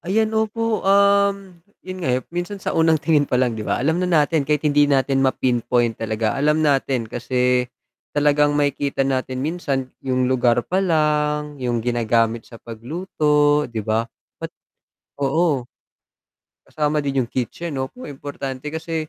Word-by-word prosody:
Ayan, 215 +4 0
opo. 220 0 0
Um, 200 -2 +2 0.2
'yun 185 0 -7
nga, 165 - -2
eh, 130 - -3
minsan 175 +3 -3
sa 195 - -4
unang 160 -1 +3
tingin 150 -2 +1
palang, 125 -1 +1
di 110 - -6
ba, - - -1
alam 160 +7 0
na 180 - 0 0.2
natin 150 -2 -1
kahit 150 0 +1
hindi 145 0 +4
natin 135 -1 +2
ma-pinpoint 120 -3 +1
talaga. 110 -1 -1
Alam 150 +3 +1
natin 135 -4 +1
kasi, 125 +2 0 0.5
talagang 145 0 +3
makikita 140 -1 0
natin 130 -1 -2
minsan 140 -6 -2
'yung 130 -1 +1
lugar 120 -1 +2
palang, 150 -5 0
'yung 120 -2 -1
ginagamit 115 -1 +1
sa 115 - -11
pagluto, 150 - 0
'di 115 -2 -4
ba? 110 +1 0 0.4
Ba't - - -6 0.7
oo. 140 -3 +1 1.0
Kasama 150 0 -1
din 140 -1 -1
'yung 120 - -8
kitchen 145 +5 -4
'no, 130 0 -2
naku, 250 - -11
importante 140 0 -6
kasi 160 0 -4
145 Hz, 150 wpm, -21 LUFS, 125-160 Hz, 1.0 s, hindi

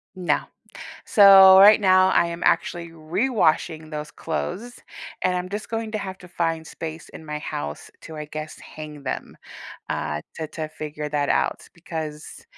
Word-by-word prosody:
No. 180 -2 +1 0.7
So, 195 -2 +8
right 210 +2 +8
now, 185 -1 +5
I 170 - +3
am 170 +1 -6
actually 170 -1 0
rewashing 165 -2 0
those 150 0 -6
clothes, 195 +9 -5 0.4
and 185 0 +1
I'm 180 0 -3
just 210 +2 -6
going 225 -1 -3
to 215 - -2
have 190 -2 -6
to 180 - -13
find 165 -2 -2
space 160 0 -8
in 160 - -12
my 150 0 -5
house 75 - -6
to, 160 - -10
I 150 - -5
guess, 155 +1 -8
hang 150 -2 -10
them, 130 - -5 0.5
uh, 75 0 -3 0.2
to 160 - -4
to 155 -1 -6
figure 150 -1 -6
that 145 -1 -1
out - - 0
because 160 -3 -7
165 Hz, 160 wpm, -23 LUFS, 155-190 Hz, 0.7 s, So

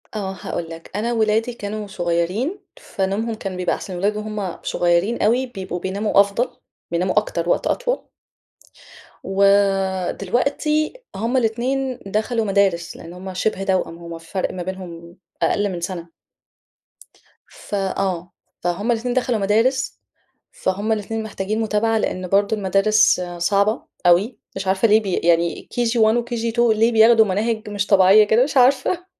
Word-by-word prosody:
آه، 195 -3 -3
هاقول 165 -1 -4
لك، 165 0 -10
أنا 230 +4 -1
ولادي 225 +1 +1
كانوا 210 -1 -5
صغيّرين 185 - -1 0.2
فنومهم 205 - -2
كان 195 -3 -6
بيبقي 180 -1 0
أحسن، 190 - -8
الولاد 200 +4 0
وهُم 210 -4 -4
صغيرين 175 +6 +1
أوي 240 +5 +2
بيبقوا 190 -7 -6
بيناموا 200 +3 0
أفضل، 200 +5 +2 0.4
بيناموا 180 +3 0
أكتر، 175 -5 -4
وقت - - +1
أطول. - - -1 1.2
ودلوقتي 200 - +1 0.2
هُم 230 +6 0
الاتنين 255 +3 -1
دخلوا 220 +3 -1
مدارس، 195 -4 +1
لأن 170 - -10
هُم 185 +1 -8
شِبه 195 +1 -1
توأم، 185 -3 -1
هُم 170 0 -8
الفرق 165 +3 -4
ما 180 - -5
بينهم 175 -2 -8 0.2
أقل 205 +5 +1
من 175 -2 -5
سنة، 170 -1 -5 1.4
فآه، 190 -3 -3 0.3
فَهُم 180 +7 0
الاتنين 240 +1 -1
دخلوا 250 -3 0
مدارس، 230 +7 +1 0.5
فَهُم 200 +4 -2
الاتنين 220 +1 -2
محتاجين 215 0 -3
متابعة، 220 +1 +1
لأن 185 -3 -2
برضه 200 +3 +2
المدارس 200 +1 +3 0.2
صعبة 200 +5 +1 0.2
أوي، 180 +8 +3 0.2
مش 195 0 -4
عارفة 190 +4 +3
ليه 215 +1 +5
بي 195 -4 -3
يعني 170 0 +1
KG1، 230 -2 +2
وKG2 235 -1 +1
ليه 225 +2 +3
بياخدوا 225 0 +6
مناهج 215 +3 -1
مش 205 -1 -2
طبيعية 195 +2 +6
كده 220 +3 +3
مش 280 +1 -2
عارفة، 275 +8 +3
205 Hz, 140 wpm, -21 LUFS, 185-225 Hz, 1.4 s, بياخدوا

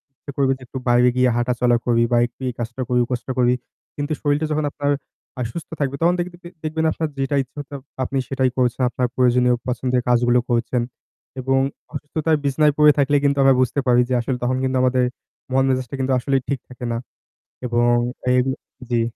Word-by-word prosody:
ইচ্ছা 140 - -10
করবে 135 -1 +3
যে - - -25
একটু 130 - -7
বাইরে 125 +1 +5
গিয়ে 125 0 +4
হাঁটা 120 +1 +1
চলা 120 -1 +4
করি 115 -1 +3
বা 120 - +4
একটু 125 - -28
এই - - -5
কাজটা 120 +3 -4
করি, 125 -1 +2
ওই - - -5
কাজটা 125 +1 -3
করি। 125 0 +4 0.4
কিন্তু 145 +2 -2
শরীরটা 145 +1 +1
যখন 150 0 0
আপনার 145 -1 -1 0.5
আ - - -1
সুস্থ 165 - -7
থাকবে 140 -1 -1
তখন 175 +2 +4
দেখতিদে 175 0 -5
দেখবেন 160 +1 -1
আপনার 160 - -2
যেটা 135 +1 0
ইচ্ছা 135 +3 -12 0.4
আপনি 135 +2 -2
সেটাই 130 -1 +1
করছেন। 125 0 +1
আপনার 125 0 -1
প্রয়োজনীয় 125 -1 +3
পছন্দের 125 0 0
কাজগুলো 120 0 +4
করছেন। 120 +1 +1 0.6
এবং 135 +1 +2 0.3
অসুস্থতায় 155 +1 -1
বিছানায় 145 +1 +3
পড়ে 150 0 +7
থাকলে 145 0 +3
কিন্তু 140 0 +2
আমরা 135 -1 +6
বুঝতে 130 +3 +1
পারি 125 0 +5
যে, - - 0
আসলে 125 +1 -2
তখন 130 +1 +1
কিন্তু 130 0 0
আমাদের 130 0 +3 0.5
মন-মেজাজটা 130 -1 +1
কিন্তু 130 0 +1
আসলেই 135 +1 0
ঠিক 140 -3 0
থাকে 125 -1 -8
না। 115 - -1 0.7
এবং 120 0 +2 0.4
এইগুলো 130 +1 +2 0.3
জ্বি। 120 -1 +2
130 Hz, 190 wpm, -21 LUFS, 125-140 Hz, 0.7 s, পড়ে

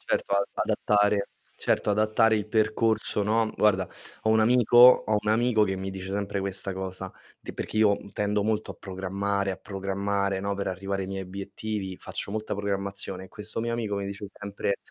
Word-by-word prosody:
Certo, 100 - -1
a 100 - +4 0.2
adattare 105 -1 +2 0.3
certo, - - +1
adattare 110 +1 +3
il 105 0 -2
percorso, 110 -1 +1
no, 110 +3 +2
mhmm, - - -6
guarda, 95 -4 +3 0.3
ho 110 - +2
un 110 0 +5
amico 120 +1 +3
ho 120 -3 +8
un 105 - 0
amico 110 0 +3
che 95 -2 +1
mi 95 +1 -4
dice 95 0 -6
sempre 100 0 -2
questa 95 0 -2
cosa, 95 0 -5 0.3
ti - - -8
perché - - -5
io, 105 -2 +5
mhmm, - - -10
tendo 105 0 0
molto 110 0 -1
a - - -18
programmare, 100 +1 -2
a - - -6
programmare, 100 0 -2
no, 100 +1 -1
per 100 - -3
arrivare 95 +1 -2
ai - - -4
miei 95 0 -4
obiettivi, 100 +1 -5
faccio 100 - -6
molta 110 -1 -3
programmazione. 100 -1 -3
E - - -13
questo 105 +3 -5
mio 115 0 -1
amico 115 -3 -2
mi 100 - -2
dice 100 +1 -6
sempre 100 -1 -3
100 Hz, 195 wpm, -27 LUFS, 95-110 Hz, 0.3 s, ho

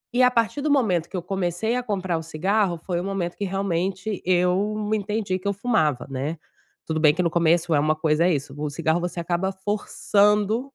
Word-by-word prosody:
E 255 - +4
a 250 - +7
partir 230 +3 0
do 300 - 0
momento 195 - +2
que 190 - -5
eu 175 - -4
comecei 195 +4 -1
a 250 - 0
comprar 190 -7 -2
o - - -5
cigarro, 180 +3 0
foi 175 -2 -1
o - - -4
momento 190 -3 -3
que 205 - -3
realmente 195 +1 -2
eu 185 +4 +1
entendi 210 -2 -1
que 200 - -6
eu 200 - +1
fumava, 160 - 0
né. 140 +5 -3 0.5
Tudo 160 0 -2
bem 150 -2 +5
que 180 - 0
no 170 - +1
começo 170 0 +2
é 145 - +4
uma 155 +1 +2
coisa 155 +1 +2
é 180 - +3
isso, 140 0 -5
o 150 0 -3
cigarro 160 +3 0
você 175 0 -4
acaba 175 +3 -1
forçando 210 +4 +1
185 Hz, 210 wpm, -24 LUFS, 165-205 Hz, 0.5 s, a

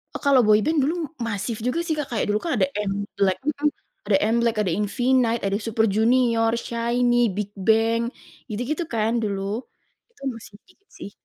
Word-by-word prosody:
Oh, - - -3
kalau 275 -4 +4
boy 210 0 +5
band 315 -1 +1
dulu 315 +5 0 0.3
masif 220 0 -3
juga 250 +7 0
sih, 315 - 0
Kak. 290 -2 -2
Kayak 225 - 0
dulu 210 +1 +2
kan 330 - 0
ada 190 - +3 0.2
MBLAQ, 200 0 -1
mhm. 300 0 +1 0.4
Ada 195 -2 +4 0.2
MBLAQ, 235 -2 +1
ada 170 - 0
Infinite 245 +1 +1
ada 195 +1 0
Super 225 0 +1
Junior, 225 +2 +3
SHINEe, 240 -1 +1
BigBang 220 +3 +1 0.5
gitu-gitu 250 +10 -2
kan 220 0 +1
dulu. 200 -2 -2 0.7
Itu 435 - -28
masih 225 -2 -12
dikit 400 +2 -27
sih. 200 - -8
230 Hz, 165 wpm, -23 LUFS, 210-250 Hz, 0.7 s, boy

